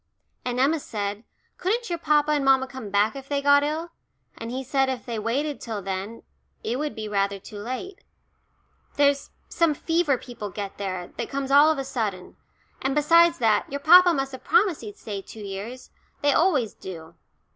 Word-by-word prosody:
And 250 0 -2
Emma 295 +5 +3
said, 205 -4 -4 0.4
couldn't 445 +3 -1
your 340 - -2
papa 300 -2 +2
and 295 -2 +1
mamma 265 -1 +4
come 260 -5 -8
back 205 +3 +2
if 275 0 -9
they 285 -1 +1
got 285 0 +5
ill, 315 +3 -3 0.4
and 230 - -7
he 260 +2 -4
said 270 0 +1
if 255 -2 -4
they 230 -3 -3
waited 275 +7 -2
till 225 -3 -4
then 195 +3 -5 0.4
it 245 +3 -2
would 300 0 -3
be 215 -1 -5
rather 200 -1 0
too 205 +2 -10
late. 255 - -6 0.9
There's 285 -1 +2 0.2
some 330 -3 +1
fever 325 -3 +1
people 235 -5 -8
get 200 0 -6
there, 185 -3 -4
that - - -3
comes 275 0 -3
all 290 +2 +7
of 315 - -1
a 275 - -2
sudden. 210 -8 -4 0.5
And 270 +1 -1
besides 335 +3 +5
that, 220 -3 +2
your 280 - -3
papa 355 +4 +8
must 270 -4 -1
have 260 - -9
promised 415 -8 +3
he'd 210 -3 -9
stay 200 -3 -6
two 215 +3 -11
years 205 +6 -7 0.3
they 285 -1 +4
always 295 - +2
do." 165 -4 -9
265 Hz, 190 wpm, -25 LUFS, 210-295 Hz, 0.9 s, papa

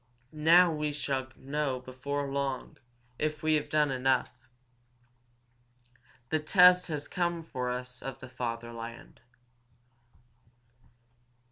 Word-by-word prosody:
Now 165 +3 +5
we 150 -1 -1
shall 135 -2 -2
know 140 -1 -2
before 130 +3 -4
long 135 -1 -3 0.4
if 155 0 -2
we 155 0 +3
have 150 -1 0
done 150 -2 +2
enough. 130 -2 0 1.8
The 155 - +2
test 180 +3 +6
has 150 -3 -4
come 175 -2 -1
for 125 -5 -4
us 125 0 -5
of 135 -1 -6
the 130 - -9
fatherland." 115 -1 -6
140 Hz, 105 wpm, -30 LUFS, 130-155 Hz, 1.8 s, test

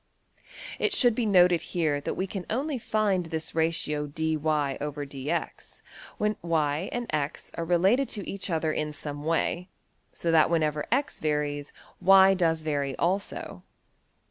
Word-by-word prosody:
It 420 - +1
should 245 -9 +4
be 230 0 -1
noted 180 -4 +5
here 155 -5 -1
that - - -3
we 190 - -1
can 195 -1 -6
only 270 +3 -1
find 205 -6 0
this 160 -1 -4
ratio~$\dfrac{dy}{dx}$ 150 -3 -2 0.4
when 210 0 0
$y$~and~$x$ 160 +1 -2
are 170 - -3
related 190 +10 +3
to 205 -3 -4
each 200 0 -4
other 160 -2 0
in 150 0 -2
some 145 -1 -6
way, 165 +3 0 0.4
so 170 - -2
that 160 -1 +5
whenever 155 -3 0
$x$~varies 150 - -1 0.3
$y$~does 190 -4 +5
vary 140 -3 -1
also. 190 +4 -2
165 Hz, 120 wpm, -27 LUFS, 150-195 Hz, 0.4 s, noted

